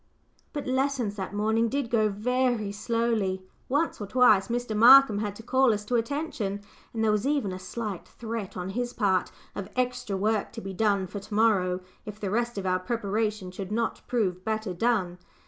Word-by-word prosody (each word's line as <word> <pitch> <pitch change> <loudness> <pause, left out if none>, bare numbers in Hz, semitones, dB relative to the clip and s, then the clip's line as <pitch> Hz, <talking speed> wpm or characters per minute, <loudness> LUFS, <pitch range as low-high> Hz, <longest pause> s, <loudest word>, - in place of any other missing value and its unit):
But 290 - -4
lessons 260 -5 0
that 190 -2 -4
morning 220 +2 +1
did 275 -2 -2
go 215 -2 +3
very 240 0 0
slowly. 210 -3 -1 0.3
Once 290 -1 0
or 205 - -4
twice 215 -4 +5
Mr. 240 -2 -2
Markham 235 -1 +8
had 205 -1 -3
to 225 - -11
call 260 +1 +3
us 210 0 -6
to 245 - -4
attention, 230 -5 -2 0.3
and 225 -1 -2
there 220 - +3
was 210 +4 0
even 280 -9 0
a 185 - -6
slight 205 -1 -5
threat 225 -5 -6
on 180 +1 -4
his 245 +3 -3
part 190 -4 +1 0.2
of 200 - -6
"extra 250 -5 -1
work 210 +1 0
to 230 - -6
be 195 -2 -6
done 200 -1 +1
for 200 +3 -6
to 205 +2 -10
morrow," 190 -5 +2 0.2
if 210 0 -8
the 200 -3 -3
rest 235 +1 -1
of 195 - -3
our 185 0 +1
preparation 210 -1 -2
should 190 +1 -7
not 230 +1 -1
prove 185 -7 0
better 215 -2 -2
done. 185 -3 0
215 Hz, 190 wpm, -27 LUFS, 195-240 Hz, 0.3 s, Markham